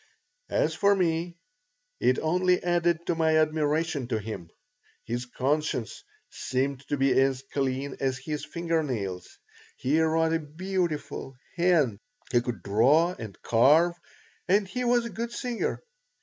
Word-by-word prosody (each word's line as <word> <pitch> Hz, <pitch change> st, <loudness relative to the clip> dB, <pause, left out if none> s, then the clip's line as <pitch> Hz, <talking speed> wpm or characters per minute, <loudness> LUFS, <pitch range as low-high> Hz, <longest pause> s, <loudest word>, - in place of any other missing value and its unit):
As -, -, +1 dB
for 200 Hz, 0 st, +3 dB
me, 170 Hz, -1 st, -1 dB, 0.6 s
it 130 Hz, -, +3 dB
only 180 Hz, +3 st, +2 dB
added 175 Hz, -1 st, +1 dB
to -, -, +1 dB
my 160 Hz, -1 st, +2 dB
admiration 155 Hz, -2 st, +1 dB
of 110 Hz, -, 0 dB
him. 100 Hz, -6 st, -6 dB, 0.6 s
His 120 Hz, +1 st, -3 dB
conscience 135 Hz, -1 st, -1 dB, 0.3 s
seemed 130 Hz, +1 st, -2 dB
to 145 Hz, -, -1 dB
be 135 Hz, 0 st, +3 dB
as 135 Hz, -1 st, +1 dB
clean 135 Hz, 0 st, -1 dB
as 130 Hz, -1 st, 0 dB
his 150 Hz, +3 st, -5 dB
finger 170 Hz, -1 st, -1 dB
nails. 100 Hz, -11 st, -4 dB, 0.4 s
He 150 Hz, +5 st, +1 dB
wrote 160 Hz, 0 st, +2 dB
a 165 Hz, -, +2 dB
beautiful 160 Hz, -3 st, -3 dB, 0.2 s
hand, 165 Hz, -, +2 dB, 0.3 s
he 120 Hz, -, +4 dB
could 120 Hz, -7 st, -5 dB
draw 140 Hz, -, +4 dB
and 110 Hz, -3 st, -8 dB
carve, 150 Hz, +9 st, +5 dB, 0.5 s
and 195 Hz, +2 st, +3 dB
he 250 Hz, +6 st, -3 dB
was 240 Hz, 0 st, +3 dB
a -, -, -4 dB
good 230 Hz, +4 st, -4 dB
singer. 245 Hz, -, -3 dB
155 Hz, 140 wpm, -27 LUFS, 130-175 Hz, 0.6 s, carve